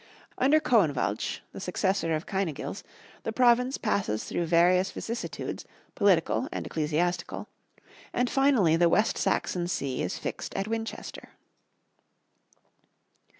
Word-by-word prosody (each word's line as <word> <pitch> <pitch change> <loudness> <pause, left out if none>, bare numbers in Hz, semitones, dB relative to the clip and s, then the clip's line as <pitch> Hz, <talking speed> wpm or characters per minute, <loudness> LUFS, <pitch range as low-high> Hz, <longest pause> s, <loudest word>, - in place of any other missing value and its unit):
Under 285 +4 +5
Coinwalch, 145 - +1
the - - -8
successor 190 -3 0
of 155 - -4
Cynegils, 190 -4 -3 0.4
the - - -3
province 250 +2 +3
passes 200 - -1
through 170 - -2
various 180 +3 +4
vicissitudes, 230 +1 -5 0.3
political 200 - +2
and - - -4
ecclesiastical, 170 +3 -1 0.6
and 245 - +1
finally 255 - +3
the 170 0 +4
West 210 +6 +2
Saxon 180 -2 0
see 135 -7 -2
is 90 - -2
fixed - - -5
at 195 - -1
Winchester. 225 0 -5
190 Hz, 110 wpm, -28 LUFS, 165-225 Hz, 0.6 s, Under